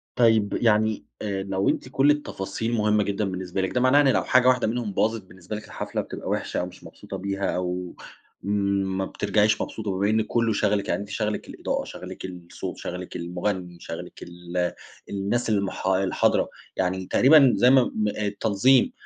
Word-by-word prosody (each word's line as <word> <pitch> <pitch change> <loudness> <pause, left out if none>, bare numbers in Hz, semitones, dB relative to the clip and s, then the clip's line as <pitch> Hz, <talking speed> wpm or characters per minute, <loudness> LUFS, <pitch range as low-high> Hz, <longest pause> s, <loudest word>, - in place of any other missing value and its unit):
طيب، 110 -4 +3
يعني 110 -1 +2 0.2
آآ 100 -2 -2
لو 95 0 0
أنتِ 130 - -2
كل 135 +2 +4
التفاصيل 115 -5 -3
مهمّة 105 -1 +2
جدًا 100 +1 -1
بالنسبة 95 0 -3
لِك 95 - -1
ده 125 - +1
معناه 135 +3 +5
إن 140 - +3
لو 130 - +3
حاجة 125 0 +4
واحدة 125 -3 +4
منهم 115 -2 -2
باظت 110 +2 +1
بالنسبة 95 +2 -8
لِك 105 - -7
الحفلة - - -4
بتبقى - - -7
وحشة، - - -1
أو 90 - -1
مش 90 0 -12
مبسوطة 95 +4 -9
بيها 100 +1 -2
أو 90 0 -3 0.5
ما 100 -1 0
بترجعيش 105 +2 +1
مبسوطة، 110 -3 -4
بمّا 100 +2 0
إن 110 0 +3
كلّه 115 0 +1
شَاغَلِك، 105 -1 +1
يعني - - 0
أنتِ 100 - -8
شاغلِك 105 +1 -2
الإضاءة، - - -2
شَاغلِك - - -8
الصوت، 90 -2 -7
شَاغلِك 90 +1 -6
المغني، 90 0 -3
شَاغلِك 80 - -8
ال 90 0 -3 0.4
الناس 100 +4 -1
الح 100 -2 -1
الحاضرة، 95 0 +2 0.3
يعني 95 0 -1
تقريبًا 135 +4 +6
زي 125 - +5
ما-ما 120 -5 +3
آآ 105 - -1
التنظيم، 110 - +3
100 Hz, 175 wpm, -25 LUFS, 95-110 Hz, 0.5 s, تقريبًا